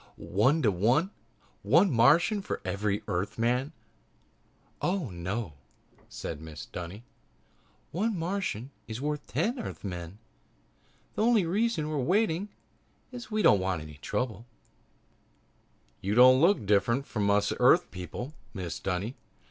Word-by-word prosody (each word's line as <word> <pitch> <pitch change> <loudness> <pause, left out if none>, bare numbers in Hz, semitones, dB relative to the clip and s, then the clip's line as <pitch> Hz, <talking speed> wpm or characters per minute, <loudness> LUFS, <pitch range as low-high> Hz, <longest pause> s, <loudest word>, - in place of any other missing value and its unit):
"One 135 +11 +2
to 105 - +4
one? 120 - +2 0.5
One 165 - +4
Martian 150 - +4
for - - -4
every 100 +2 -1
Earthman?" 120 - -1 1.1
"Oh, 175 - -1
no," 90 +2 -4 0.6
said 75 - -6
Mrs. 80 -2 -9
Dunny, 90 +6 -7 0.9
"one 210 +4 -1
Martian 165 - -3 0.2
is 110 +1 -5
worth 150 +1 -3
ten 245 +4 -1
Earthmen. 90 - -6 1.0
The - - -2
only 225 -4 +4
reason 200 -2 0
we're 155 -1 -2
waiting 185 - +1 0.6
is 245 -1 -8
we 215 -1 0
don't 100 - +6
want 95 -4 -1
any 75 -2 -12
trouble." 115 - -3 1.5
"You 100 +2 -1
don't 130 +2 +7
look 180 +4 +5
any 110 - -9
different 105 +7 +2
from 105 -6 -1
us 105 0 +2
Earth - - +5
people, 90 - -6 0.2
Mrs. 90 -4 -5
Dunny. 100 +5 -2
120 Hz, 125 wpm, -29 LUFS, -, 1.5 s, don't